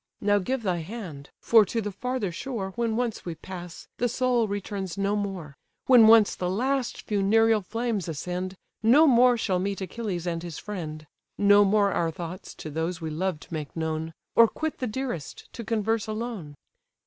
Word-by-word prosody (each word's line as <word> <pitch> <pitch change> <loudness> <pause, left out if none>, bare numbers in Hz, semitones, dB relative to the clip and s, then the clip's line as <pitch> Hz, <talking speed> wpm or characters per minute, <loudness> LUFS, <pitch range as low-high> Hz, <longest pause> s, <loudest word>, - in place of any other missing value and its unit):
Now 205 0 +3
give 245 +6 -2
thy 185 -4 0
hand; 165 -6 -8
for 225 -2 +6
to 230 - -2
the 210 -2 -3
farther 250 -1 -3
shore 195 0 -4
When 230 -2 0
once 240 -2 -2
we 170 -2 -5
pass, 175 +1 -9
the 245 - +1
soul 245 -2 +1
returns 200 -3 -4
no 200 +1 +1
more: 190 -8 -4 0.3
When 245 -4 +7
once 220 -2 +7
the 180 - -2
last 255 +5 -1
funereal 215 +2 +3
flames 225 -1 -2
ascend, 180 +4 -4 0.3
No 250 +9 +6
more 250 -3 +5
shall 190 -5 0
meet 195 +1 -2
Achilles 190 -3 -4
and 170 -2 -2
his 170 -3 -7
friend; 155 -7 -6 0.3
No 205 0 +6
more 200 0 +3
our 170 -2 0
thoughts 170 +2 -7
to 155 - -8
those 160 +3 -2
we 160 -2 -4
loved 175 0 -3
make 155 -3 -5
known; 160 0 -3 0.2
Or 230 - +8
quit 315 +6 -4
the 255 - -1
dearest, 235 - -5
to 235 - -6
converse 225 0 0
alone. 215 -9 -5
200 Hz, 175 wpm, -26 LUFS, 175-230 Hz, 0.3 s, Or